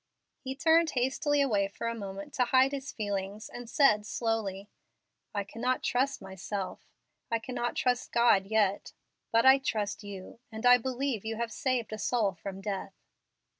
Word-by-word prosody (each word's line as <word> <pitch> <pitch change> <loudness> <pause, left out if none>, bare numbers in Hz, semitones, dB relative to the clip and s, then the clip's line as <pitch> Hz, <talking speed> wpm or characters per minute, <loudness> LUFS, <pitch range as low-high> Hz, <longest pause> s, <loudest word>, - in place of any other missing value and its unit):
He 265 0 -5
turned 320 +3 +4
hastily 275 +2 +1
away 210 -8 +2
for 200 - -7
a 230 - -1
moment 200 -3 -7
to 250 - +2
hide 260 +2 +4
his 280 -1 -5
feelings, 205 0 -4
and 245 -1 -9
said, 230 -5 +4
slowly, 210 -3 -2 0.7
"I 200 - 0
cannot 240 +5 -2
trust 265 -2 0
myself 190 +1 -5 0.4
I 230 - +2
cannot 240 +1 -3
trust 250 -1 0
God 235 -5 +4
yet; 205 -2 +1 0.4
but 230 +1 +4
I 265 +1 +8
trust 210 -5 -2
you, 200 +1 -9
and 220 +2 -6
I 245 0 +8
believe 260 -2 -2
you 225 0 -3
have 230 0 -3
saved 250 -2 -1
a 215 - -5
soul 210 -2 +1
from 195 +2 -7
death." 195 -1 -4
225 Hz, 165 wpm, -30 LUFS, 200-255 Hz, 0.7 s, I